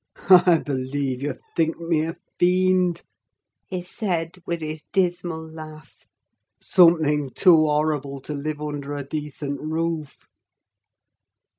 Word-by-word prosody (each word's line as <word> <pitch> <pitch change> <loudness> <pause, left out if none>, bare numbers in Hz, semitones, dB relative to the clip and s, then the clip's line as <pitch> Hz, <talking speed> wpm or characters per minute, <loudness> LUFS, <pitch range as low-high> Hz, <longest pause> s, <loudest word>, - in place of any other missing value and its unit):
"I 180 -2 +8
believe 135 -2 -3
you 145 -1 -2 0.2
think 165 -1 +1
me 165 -2 0
a 165 - -5 0.2
fiend," 180 -1 +2 0.6
he 185 -2 -4
said, 180 -4 -3
with 170 -1 -2
his 155 -1 -5
dismal 175 -3 -1
laugh: 155 -1 -12 0.5
"something 160 -6 +4
too 160 +1 +5
horrible 150 -2 0
to 150 - -6
live 150 +1 -4
under 145 -1 -4
a 145 - -4
decent 145 -1 -5
roof." 160 -1 -3
155 Hz, 115 wpm, -23 LUFS, 145-175 Hz, 0.6 s, I